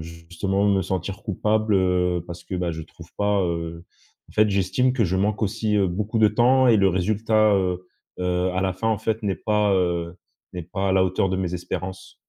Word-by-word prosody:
justement, 85 +5 -3
me 100 -1 +3
sentir 95 +3 -4
coupable, 110 0 0
heu, 90 -2 +1
parce 85 0 -9
que, 95 - -6
bah, 90 -1 -1
je 80 0 -6
trouve 85 +1 -14
pas, 100 -1 +1
heu 85 -1 -3 0.4
en - - -17
fait, 110 0 +3
j'estime 100 +7 +1
que 120 -4 +1
je 95 0 0
manque 105 +2 0
aussi, 110 +1 -1
heu, 95 -2 +2
beaucoup 105 +5 -2
de 110 - +6
temps 125 +4 +4
et 115 - +6
le 95 -1 +4
résultat, 105 +3 +2
heu 90 -1 -1 0.4
heu, 90 0 0
à 95 - -1
la 95 -1 0
fin, 95 +5 -4
en 110 -2 +1
fait, 110 0 -2
n'est 100 - 0
pas, 105 -1 +1
heu, 85 -1 -1 0.4
n'est 90 - -5
pas 95 +3 -3
à - - +2
la 95 -1 +4
hauteur 95 +1 0
de 95 - 0
mes 90 -2 -2
espérances. 90 +1 -6
95 Hz, 215 wpm, -23 LUFS, 90-105 Hz, 0.4 s, de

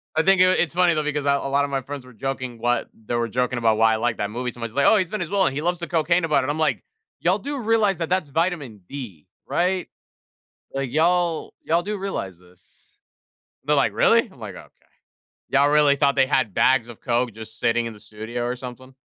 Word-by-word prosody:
I 160 - +4
think 190 +2 +4
i - - +8
it's 185 -3 +2
funny, 180 -1 +3
though, 155 -1 0
because 150 -1 -2
a - - +2
a 140 0 -1
lot 140 +1 +2
of 140 - -3
my 135 -1 -1
friends 135 0 -8
were 125 - -15
joking 130 0 -4
what 120 +1 0
they 110 +2 -5
were 120 0 0
joking 125 +2 -1
about 115 -2 +2
why 110 0 +4
I - - +2
like 115 0 -1
that 105 - -2
movie 125 +3 -3
so 120 - -13
much, 115 -1 -4
they, 140 - +2
"Oh, - - +6
he's 185 -4 0
Venezuelan. 190 -5 0
He 145 - -3
loves 175 +1 0
the 170 - -4
cocaine 170 +1 +2
about 155 -4 +2
it." 130 - -3
I'm 150 +2 -2
like, 155 -2 +1 0.4
"Y'all - - +2
do 285 0 -4
realize 220 -4 +2
that, 165 -1 -3
that's 185 -5 0
vitamin 150 - -2
D, 120 - -8 0.2
right? 180 +1 0 0.9
Like, 135 -2 -3
y'all 170 +1 +1
y'all 165 +2 +1
do 210 +3 -3
realize 100 - -4
this." 90 0 -21 0.7
They're - - +3
like, - - +2
"Really?" - - +3
I'm - - -19
like, - - -7
"Okay. - - -11 0.8
Y'all 140 +1 +3
really 150 -1 +4
thought 140 -1 +2
they 135 -1 +4
had 130 -5 +1
bags 130 +3 +3
of 120 - -11
coke 120 0 0
just 110 +1 -10
sitting 120 0 +1
in 115 - -6
the 105 - -15
studio 110 +4 -6
or 120 +1 -2
something?" 130 +1 -10
140 Hz, 235 wpm, -23 LUFS, 120-170 Hz, 0.9 s, i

